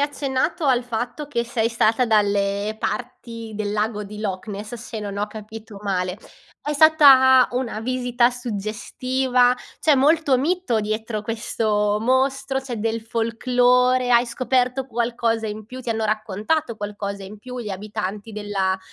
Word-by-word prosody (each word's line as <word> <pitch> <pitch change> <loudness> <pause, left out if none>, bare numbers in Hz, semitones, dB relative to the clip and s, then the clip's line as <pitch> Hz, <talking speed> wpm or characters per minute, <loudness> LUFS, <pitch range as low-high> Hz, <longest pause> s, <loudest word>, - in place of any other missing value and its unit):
accennato 285 +2 -1
al 255 -3 +3
fatto 245 +5 -4
che 240 -5 -1
sei 230 -1 0
stata 230 +1 +2
dalle 205 -1 +1
parti 230 -1 -5
del 205 -1 -2
lago 210 0 -1
di 210 +1 -9
Loch 195 -2 -4
Ness, 210 +2 -6
se 230 -1 -7
non 200 -1 -5
ho 205 - 0
capito 215 0 -10
male. 185 -2 -1 0.5
È 295 - -2
stata 275 -4 +7
una 245 -3 -3
visita 245 0 +1
suggestiva? 245 +3 0 0.2
C'è 310 - +4
molto 285 0 +3
mito 310 -5 0
dietro 215 +1 -3
questo 210 -1 0
mostro, 265 +2 +1
c'è 260 -3 -6
del 225 +1 -2
folklore, 245 +2 +2
hai 240 0 +5
scoperto 255 +2 0
qualcosa 230 -2 -1
in 210 0 -6
più? 255 +2 -9
Ti 240 - -3
hanno 220 -1 0
raccontato 215 +6 -1
qualcosa 205 -1 -5
in 210 +3 -10
più 250 +3 -8
gli 215 - -5
abitanti 210 +1 -5
della 200 -2 -1
230 Hz, 145 wpm, -22 LUFS, 210-255 Hz, 0.5 s, stata